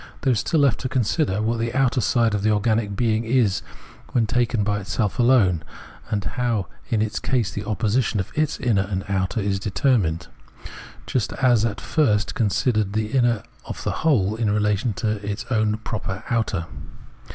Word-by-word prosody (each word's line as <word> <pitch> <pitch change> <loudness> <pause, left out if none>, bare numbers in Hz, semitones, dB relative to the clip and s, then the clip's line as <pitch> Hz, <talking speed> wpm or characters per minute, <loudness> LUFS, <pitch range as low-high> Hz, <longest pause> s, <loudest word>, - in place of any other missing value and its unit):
There 130 -3 +3
is 110 - 0
still 160 -3 +1
left 135 -6 +3
to 130 - -3
consider 125 - 0
what 115 +1 0
the 115 +2 -2
outer 130 -1 +2
side 115 -1 +2
of 105 - 0
the 110 - +2
organic 105 -1 +1
being 110 +1 +1
is 115 -4 +2 0.5
when 120 -2 +3
taken 120 -1 +1
by 105 0 0
itself 100 +2 -2
alone, 115 -9 +4 0.5
and 100 -2 -2
how 120 -6 -1 0.2
in 110 -2 +2
its 110 - -2
case 120 -6 0
the 105 - -5
opposition 110 +1 0
of 95 - -4
its 155 -1 0
inner 115 -6 +2
and 95 0 -3
outer 95 +2 -1
is 100 -1 -1
de 105 - -3
termined; 95 - +1 0.8
just 125 -6 -1
as 120 -4 +3
at 110 -3 -2
first 105 -10 +1
we - - -8
considered 105 -1 +1
the 110 0 -1
inner 120 -5 +2 0.2
of - - -7
the - - -1
whole 110 -11 +2
in 110 -2 0
relation 105 +2 +1
to 105 +3 -2
its 100 +2 -4
own 110 -2 +1
proper 105 -3 -5
outer. 105 -7 0
110 Hz, 185 wpm, -23 LUFS, 100-120 Hz, 0.8 s, alone